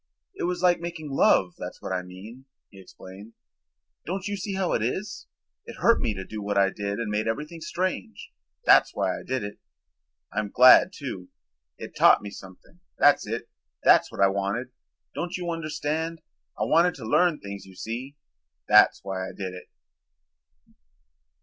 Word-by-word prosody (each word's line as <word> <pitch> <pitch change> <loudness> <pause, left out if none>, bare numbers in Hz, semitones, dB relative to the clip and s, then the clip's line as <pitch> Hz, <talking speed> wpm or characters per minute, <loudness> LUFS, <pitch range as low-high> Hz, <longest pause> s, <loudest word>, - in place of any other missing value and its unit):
"It - - -4
was 180 +1 -2
like 180 -1 +4
making 170 -3 -6
love, 95 -8 +3
that's - - -7
what - - -7
I 90 - -1
mean," 100 +8 -12 0.3
he 95 -2 -13
explained. 95 +4 -13 0.7
"Don't 190 +3 -4
you 205 - -2
see 195 0 -4
how 190 -2 0
it - - 0
is? 185 - -4 0.4
It - - -8
hurt 230 - +3
me 105 - -1
to 95 0 -6
do 110 -1 -7
what 100 0 -2
I 100 0 +4
did 100 0 -4
and 115 -3 -3
made 105 +1 -1
everything 150 +8 -4
strange. 170 - -4 0.3
That's - - +5
why - - 0
I - - -7
did 130 -2 -3
it. 105 0 -7 0.7
I'm 105 0 -2
glad, 130 - +7
too. 120 - -7 0.5
It - - -9
taught - - +5
me 100 - -7
something, 95 - -14 0.2
that's 145 -6 +4
it, 115 +2 -4 0.4
that's - - +5
what - - -5
I 100 - +7
wanted. 100 +6 -2 0.4
Don't 175 +2 -4
you 175 -1 -3
understand? 160 0 -3 0.4
I - - +1
wanted 170 +2 +3
to 120 - -9
learn 170 +7 +2
things, 100 -1 -8
you 95 - -15
see. 125 +8 -6 0.5
That's - - +6
why 95 -1 -4
I - - -11
did 95 -2 -6
it." 90 - -11
120 Hz, 175 wpm, -26 LUFS, 100-165 Hz, 0.7 s, glad